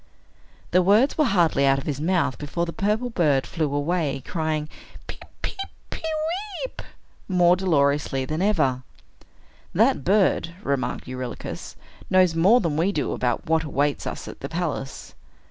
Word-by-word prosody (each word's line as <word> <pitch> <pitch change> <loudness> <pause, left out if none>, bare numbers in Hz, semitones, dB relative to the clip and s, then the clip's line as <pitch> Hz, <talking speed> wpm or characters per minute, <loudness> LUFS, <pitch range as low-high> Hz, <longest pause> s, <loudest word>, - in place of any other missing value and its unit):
The 185 - +5
words 210 +9 +4
were 305 - +3
hardly 170 - +3
out 135 0 +4
of 135 - -5
his 145 -2 -3
mouth, 160 -7 +1
before 150 +4 -2
the 170 - -6
purple 215 +5 0
bird 145 - +2
flew 155 -1 -2
away, 145 -2 -1
crying, 155 -2 -2 0.4
"Peep, - - -9 0.2
peep, 430 - -4 0.3
pe - - -6 0.6
weep," - - -8 0.5
more 180 -2 +4
dolorously 140 -6 +1
than 155 +5 -3
ever. 155 -11 +2 0.9
"That - - +3
bird," 185 -3 +2
remarked 130 -3 -2
Eurylochus, 130 -1 -6 0.3
"knows 185 -2 +4
more 190 +9 +5
than 160 -5 -1
we 175 +5 +2
do 150 -8 -1
about 120 -2 -1
what 160 0 +2
awaits 145 -1 -1
us - - -5
at - - -9
the 140 - -6
palace." 160 -5 -4
160 Hz, 150 wpm, -24 LUFS, 140-180 Hz, 0.9 s, The